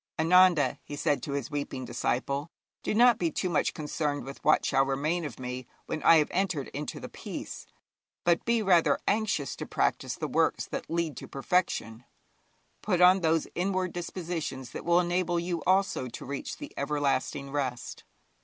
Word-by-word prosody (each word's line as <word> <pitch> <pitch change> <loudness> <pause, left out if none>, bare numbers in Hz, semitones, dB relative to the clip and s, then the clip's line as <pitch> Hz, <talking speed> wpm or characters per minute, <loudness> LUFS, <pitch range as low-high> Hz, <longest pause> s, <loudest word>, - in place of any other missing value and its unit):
'Ananda,' 175 -1 +5
he 145 - -7
said 145 0 0
to 145 - -4
his 140 -1 -3
weeping 140 -3 -4
disciple, 130 +5 -1 0.3
'do - - -1
not 240 0 +6
be 170 - +1
too 180 +4 -2
much 155 - +1
concerned 150 -1 -2
with 135 +2 -9
what - - +4
shall 135 -1 +3
remain 145 +6 -1
of 135 -4 -7
me 125 0 -5 0.2
when 155 - -4
I 165 - +7
have 150 -2 +3
entered 180 -7 -1
into 145 +2 -5
the - - -7
Peace, - - -7 0.6
but 170 -1 +3
be 235 -1 +1
rather 180 -4 +4
anxious 200 - 0
to - - -6
practise - - 0
the - - -3
works - - +1
that - - -6
lead 165 -2 -1
to - - -7
perfection; 135 - -1 0.8
put 185 -4 0
on 180 +1 +7
those 160 -1 +2
inward 185 0 -1
dispositions 165 -7 -4
that - - -7
will 170 +1 +4
enable 175 0 +1
you 170 -1 -2
also 190 -8 +2
to 120 - -8
reach 140 +1 -5
the - - -9
everlasting 140 -1 -1
rest.' 130 -4 -3
160 Hz, 175 wpm, -29 LUFS, 140-180 Hz, 0.8 s, I